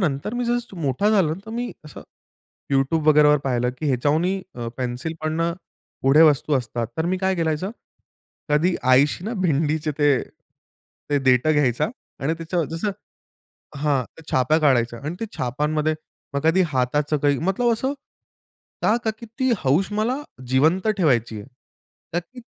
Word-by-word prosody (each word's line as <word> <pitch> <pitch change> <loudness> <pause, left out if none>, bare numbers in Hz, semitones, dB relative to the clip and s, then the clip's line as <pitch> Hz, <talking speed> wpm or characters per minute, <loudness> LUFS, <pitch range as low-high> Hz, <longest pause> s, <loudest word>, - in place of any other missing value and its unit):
नंतर 160 - -1
मी 245 - -1
जसं 240 -4 -2
मोठा 145 +10 +1
झालो 180 -7 +3
तर - - -7
मी 245 0 -3
असं 150 - -10 0.7
YouTube 150 +4 +1
वगैरे 150 -1 +6
वर 150 0 +5
पाहिलं, 125 -1 +1
की 155 - -2
ह्याच्याहुनही 155 +9 +1
अ, 120 -1 -5
पेन्सिल 125 +5 -3
पण 155 +1 -1
अ, 170 0 +1 0.5
पुढे 135 +4 +5
वस्तू 145 +1 0
असतात. 120 -1 -3
तर 160 - 0
मी 185 +2 0
काय 190 0 0
करायचो? 165 +4 -1 0.8
कधी 165 +5 +2 0.2
आईशी 140 +7 +4
ना 225 - -2
भिंडीचे 155 -2 +1
ते 145 -1 +4 1.0
ते 145 - +2
देठं 130 +4 +4
घ्यायचा 130 -5 +2 0.3
आणि 145 +4 0
त्याचंवर 165 0 -2
जसं 165 +6 -2 0.9
हां, 140 -3 +1
त्या 160 - -14
छाप 130 +5 +3
काढायचा 120 -5 +2
अन् 155 +4 -3
ते 225 - -2
छापांमध्ये 150 +5 0 0.4
मग 140 - -1
कधी 165 +4 +4
हाताचं 145 +2 0
काही. 145 -1 +2
मतलब 195 +8 +1
असं 265 +5 -1 0.9
का, 220 - +4
का 220 - +2
की 235 - -8
ती 260 -1 +2
हौस 155 +9 +1
मला 220 +5 0 0.3
जिवंत 160 - +2
ठेवायची 120 - +1
आहे. 100 - -13 0.7
का 170 - +2
की 245 +9 -14
155 Hz, 160 wpm, -23 LUFS, 135-180 Hz, 1.0 s, वगैरे